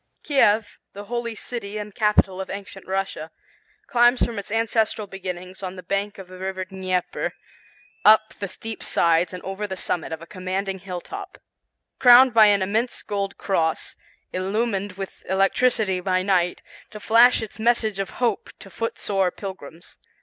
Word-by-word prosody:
Kiev, 220 Hz, -7 st, +2 dB
the 205 Hz, -, -8 dB
holy 235 Hz, +1 st, -3 dB
city 215 Hz, -3 st, -5 dB
and 210 Hz, -1 st, -6 dB
capital 210 Hz, -3 st, +2 dB
of 190 Hz, -, -7 dB
Ancient 195 Hz, -1 st, -8 dB
Russia, 190 Hz, -4 st, -3 dB, 0.6 s
climbs 240 Hz, 0 st, +4 dB
from 230 Hz, -3 st, -4 dB
its 200 Hz, -, -7 dB
ancestral 225 Hz, -1 st, +1 dB
beginnings, 185 Hz, -1 st, -7 dB
on 185 Hz, -1 st, -5 dB
the 185 Hz, -, -9 dB
banks 200 Hz, +2 st, -2 dB
of 190 Hz, -2 st, -10 dB
the 185 Hz, 0 st, -12 dB
River 190 Hz, 0 st, -3 dB
Dneiper, 185 Hz, -1 st, -2 dB, 0.7 s
up 215 Hz, 0 st, +6 dB
the 200 Hz, -, -3 dB
steep 220 Hz, +4 st, -7 dB
sides 170 Hz, +1 st, +2 dB
and 180 Hz, -1 st, -8 dB
over 195 Hz, +2 st, -4 dB
the 190 Hz, -1 st, -5 dB
summit 170 Hz, -2 st, -2 dB
of 160 Hz, -, -4 dB
a 165 Hz, -, -10 dB
commanding 190 Hz, +1 st, -3 dB
hilltop, 180 Hz, -2 st, -7 dB, 0.6 s
crowned 250 Hz, 0 st, +8 dB
by 220 Hz, -2 st, +8 dB
an 200 Hz, -2 st, +4 dB
immense 220 Hz, +6 st, -1 dB
gold 200 Hz, -1 st, -3 dB
cross, 165 Hz, -5 st, -1 dB, 0.4 s
illumined 200 Hz, +1 st, -1 dB
with 195 Hz, 0 st, -8 dB
electricity 195 Hz, 0 st, +2 dB
by 185 Hz, 0 st, 0 dB
night, 180 Hz, -2 st, +1 dB, 0.3 s
to 210 Hz, -, -9 dB
flash 230 Hz, +2 st, +5 dB
its 220 Hz, 0 st, -9 dB
message 220 Hz, -3 st, +1 dB
of 195 Hz, -, -2 dB
hope 235 Hz, -5 st, 0 dB
to 195 Hz, -, -13 dB
foot 230 Hz, 0 st, -3 dB
sore 195 Hz, -2 st, +1 dB
pilgrims. 175 Hz, -4 st, -10 dB
195 Hz, 160 wpm, -23 LUFS, 185-220 Hz, 0.7 s, crowned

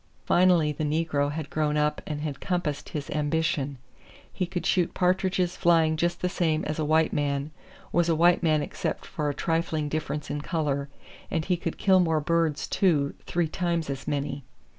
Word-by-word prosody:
Finally 175 Hz, -4 st, +4 dB
the 150 Hz, -, -4 dB
negro 150 Hz, -2 st, 0 dB
had 150 Hz, -1 st, -5 dB
grown 150 Hz, -1 st, 0 dB
up 150 Hz, 0 st, +1 dB
and 150 Hz, -1 st, -3 dB
had 150 Hz, -3 st, -4 dB
compassed 170 Hz, -6 st, -2 dB
his 145 Hz, -2 st, -4 dB
ambition: 145 Hz, -2 st, 0 dB, 0.6 s
he 185 Hz, -3 st, -2 dB
could 175 Hz, 0 st, -4 dB
shoot 180 Hz, -3 st, +1 dB
partridges 185 Hz, -1 st, +1 dB
flying 165 Hz, -2 st, +3 dB
just 175 Hz, +2 st, -1 dB
the 180 Hz, -, +1 dB
same 160 Hz, -3 st, 0 dB
as 155 Hz, +1 st, -3 dB
a -, -, +1 dB
white 155 Hz, +1 st, +2 dB
man, 140 Hz, 0 st, -1 dB, 0.4 s
was 170 Hz, 0 st, +2 dB
a 165 Hz, -, +3 dB
white 170 Hz, +2 st, +4 dB
man 155 Hz, -3 st, +2 dB
except -, -, -4 dB
for 150 Hz, -2 st, -2 dB
a -, -, -1 dB
trifling 165 Hz, -2 st, -1 dB
difference 150 Hz, -1 st, -3 dB
in 145 Hz, -, -3 dB
color; 145 Hz, -4 st, -1 dB, 0.4 s
and 160 Hz, -1 st, -1 dB
he 180 Hz, -, +2 dB
could 165 Hz, -1 st, -4 dB
kill 190 Hz, -2 st, +4 dB
more 165 Hz, -3 st, +2 dB
birds, 160 Hz, -1 st, 0 dB
too, 150 Hz, -7 st, +2 dB
three 175 Hz, -1 st, +1 dB
times 170 Hz, -2 st, -1 dB
as 135 Hz, 0 st, -6 dB
many. 140 Hz, -1 st, -2 dB
155 Hz, 185 wpm, -27 LUFS, 150-170 Hz, 0.6 s, Finally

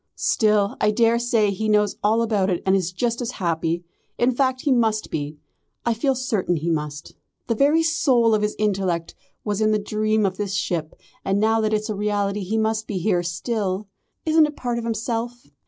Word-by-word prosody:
Still, 210 Hz, -2 st, +2 dB
I 210 Hz, -, +4 dB
daresay 230 Hz, -1 st, +2 dB
he 215 Hz, +3 st, -2 dB
knows 210 Hz, -1 st, +2 dB
all 220 Hz, +3 st, +2 dB
about 205 Hz, -4 st, +1 dB
it 175 Hz, -2 st, -1 dB
and 190 Hz, 0 st, +4 dB
is 180 Hz, -2 st, 0 dB
just 235 Hz, +6 st, -1 dB
as 245 Hz, 0 st, -3 dB
happy. 170 Hz, -1 st, -1 dB, 0.3 s
In 245 Hz, +2 st, +3 dB
fact 260 Hz, 0 st, 0 dB
he 285 Hz, -, +1 dB
must 225 Hz, -4 st, +1 dB
be. 150 Hz, 0 st, -4 dB, 0.5 s
I 235 Hz, -, +2 dB
feel 265 Hz, +4 st, 0 dB
certain 225 Hz, -9 st, 0 dB
he 165 Hz, +2 st, -1 dB
must. 150 Hz, -2 st, -4 dB, 0.3 s
The 230 Hz, -, 0 dB
very 290 Hz, +7 st, +3 dB
soul 260 Hz, -8 st, +3 dB
of 215 Hz, -, +2 dB
his 210 Hz, 0 st, -1 dB
intellect 190 Hz, -5 st, -1 dB, 0.3 s
was 210 Hz, 0 st, -2 dB
in 215 Hz, 0 st, +3 dB
the -, -, +3 dB
dream 215 Hz, +1 st, 0 dB
of 190 Hz, -1 st, -1 dB
this 200 Hz, -2 st, -2 dB
ship, 165 Hz, -4 st, -2 dB, 0.3 s
and 195 Hz, +1 st, +1 dB
now 220 Hz, +1 st, +3 dB
that 215 Hz, 0 st, 0 dB
it's 215 Hz, 0 st, 0 dB
a -, -, -1 dB
reality 205 Hz, 0 st, -1 dB
he 200 Hz, +4 st, -2 dB
must 220 Hz, 0 st, 0 dB
be 200 Hz, -, -3 dB
here 180 Hz, -1 st, +1 dB
still. 190 Hz, +3 st, -2 dB, 0.4 s
Isn't 315 Hz, -1 st, +5 dB
it 300 Hz, -, -8 dB
part 240 Hz, -1 st, -2 dB
of 230 Hz, -, -5 dB
himself? 235 Hz, +1 st, -3 dB
215 Hz, 200 wpm, -23 LUFS, 190-235 Hz, 0.5 s, Isn't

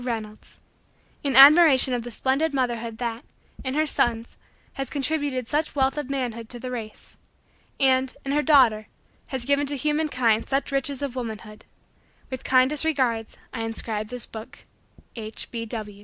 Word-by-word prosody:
Reynolds 220 Hz, -3 st, -6 dB, 0.6 s
In 275 Hz, -3 st, 0 dB
admiration 275 Hz, -2 st, +8 dB
of 245 Hz, -, -1 dB
the 240 Hz, -, -7 dB
splendid 275 Hz, +6 st, 0 dB
motherhood 235 Hz, -3 st, -2 dB
that, 235 Hz, -1 st, -4 dB, 0.4 s
in 260 Hz, +1 st, -3 dB
her 310 Hz, +1 st, +2 dB
sons, 235 Hz, -5 st, -1 dB, 0.4 s
has 270 Hz, -2 st, -4 dB
contributed 285 Hz, -3 st, -2 dB
such 300 Hz, +4 st, -1 dB
wealth 265 Hz, -1 st, +1 dB
of 295 Hz, -3 st, -5 dB
manhood 240 Hz, -5 st, -4 dB
to 240 Hz, -, -6 dB
the 255 Hz, +1 st, -6 dB
race. 220 Hz, -3 st, -8 dB, 0.6 s
And, 260 Hz, -1 st, +3 dB
in 275 Hz, -, -2 dB
her 295 Hz, +1 st, +2 dB
daughter, 250 Hz, -8 st, +4 dB, 0.4 s
has 260 Hz, -3 st, -4 dB
given 285 Hz, +1 st, +1 dB
to 285 Hz, 0 st, -2 dB
human 300 Hz, +3 st, 0 dB
kind 230 Hz, -5 st, +1 dB
such 275 Hz, +1 st, -2 dB
riches 275 Hz, 0 st, -2 dB
of 270 Hz, -3 st, -4 dB
womanhood. 220 Hz, -3 st, -7 dB, 0.7 s
With 260 Hz, -, -5 dB
kindest 260 Hz, +3 st, +3 dB
regards, 255 Hz, -8 st, -1 dB, 0.2 s
I 230 Hz, -, -4 dB
inscribe 225 Hz, -1 st, -3 dB
this 250 Hz, +1 st, -4 dB
book. 220 Hz, 0 st, -11 dB, 0.5 s
H. 220 Hz, -1 st, -4 dB
255 Hz, 155 wpm, -24 LUFS, 230-280 Hz, 0.7 s, admiration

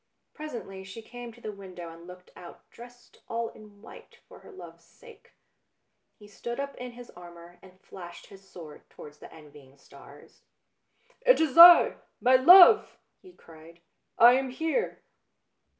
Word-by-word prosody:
Presently 235 Hz, -11 st, -10 dB
she 195 Hz, +4 st, -13 dB
came 245 Hz, +1 st, -12 dB
to 240 Hz, +1 st, -21 dB
the 215 Hz, -, -8 dB
window 185 Hz, -4 st, -12 dB
and 165 Hz, +1 st, -16 dB
looked 180 Hz, 0 st, -16 dB
out, 175 Hz, -1 st, -16 dB
dressed 245 Hz, +1 st, -18 dB
all 230 Hz, 0 st, -5 dB
in 210 Hz, -1 st, -19 dB
white -, -, -17 dB
for -, -, -17 dB
her -, -, -18 dB
love's 385 Hz, -, -15 dB
sake. 465 Hz, -3 st, -21 dB, 0.8 s
He 210 Hz, -, -18 dB
stood 235 Hz, +4 st, -9 dB
up 280 Hz, 0 st, -6 dB
in 250 Hz, -1 st, -10 dB
his 245 Hz, 0 st, -15 dB
armour 175 Hz, 0 st, -16 dB
and 185 Hz, 0 st, -20 dB
flashed 175 Hz, -2 st, -14 dB
his 195 Hz, -1 st, -19 dB
sword 155 Hz, -4 st, -15 dB
towards 150 Hz, 0 st, -16 dB
the -, -, -15 dB
envying 145 Hz, -3 st, -19 dB
stars. -, -, -19 dB, 0.4 s
" -, -, -39 dB
It -, -, +4 dB
is 315 Hz, -5 st, -2 dB
I, 340 Hz, +1 st, +7 dB, 0.2 s
my 255 Hz, +1 st, +2 dB
love 360 Hz, -, +7 dB
1 -, -, -27 dB, 0.2 s
" -, -, -52 dB
he 370 Hz, -1 st, -19 dB
cried. 165 Hz, -, -19 dB, 0.2 s
" -, -, -54 dB
I 240 Hz, +2 st, +6 dB
am 265 Hz, +1 st, -2 dB
here." 320 Hz, -, -5 dB
220 Hz, 170 wpm, -25 LUFS, 175-260 Hz, 0.8 s, I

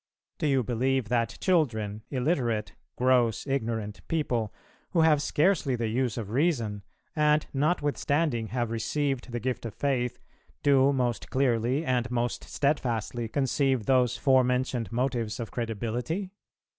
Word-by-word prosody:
Do 155 Hz, -, +1 dB
you 135 Hz, -3 st, +2 dB
believe 125 Hz, +1 st, 0 dB
that 115 Hz, -1 st, 0 dB
children, 110 Hz, -, +1 dB
illiterate, 125 Hz, -5 st, 0 dB, 0.2 s
gross, 125 Hz, -3 st, +2 dB
ignorant 115 Hz, -6 st, -2 dB
people, 120 Hz, -9 st, -1 dB, 0.4 s
who 170 Hz, -, +4 dB
have 155 Hz, -3 st, +4 dB
scarcely 150 Hz, -3 st, +2 dB
the 115 Hz, -2 st, -1 dB
use 120 Hz, 0 st, 0 dB
of 105 Hz, -3 st, -5 dB
Reason, 120 Hz, -7 st, 0 dB, 0.3 s
and 150 Hz, 0 st, +3 dB
notwithstanding 145 Hz, -4 st, 0 dB
have 120 Hz, 0 st, -2 dB
received 135 Hz, +3 st, -1 dB
the 120 Hz, -, -2 dB
gift 125 Hz, 0 st, -2 dB
of 115 Hz, -3 st, -6 dB
Faith, 125 Hz, -4 st, -1 dB, 0.4 s
do 140 Hz, -1 st, +5 dB
most 125 Hz, -4 st, -1 dB
clearly 130 Hz, +2 st, +1 dB
and 125 Hz, -2 st, 0 dB
most 120 Hz, -1 st, -2 dB
steadfastly 120 Hz, -5 st, -1 dB
conceive 135 Hz, -1 st, +1 dB
those 125 Hz, -2 st, +3 dB
forementioned 125 Hz, -2 st, +2 dB
motives 120 Hz, -2 st, -1 dB
of 115 Hz, -, -5 dB
credibility? 120 Hz, -, -3 dB
125 Hz, 130 wpm, -28 LUFS, 115-140 Hz, 0.4 s, do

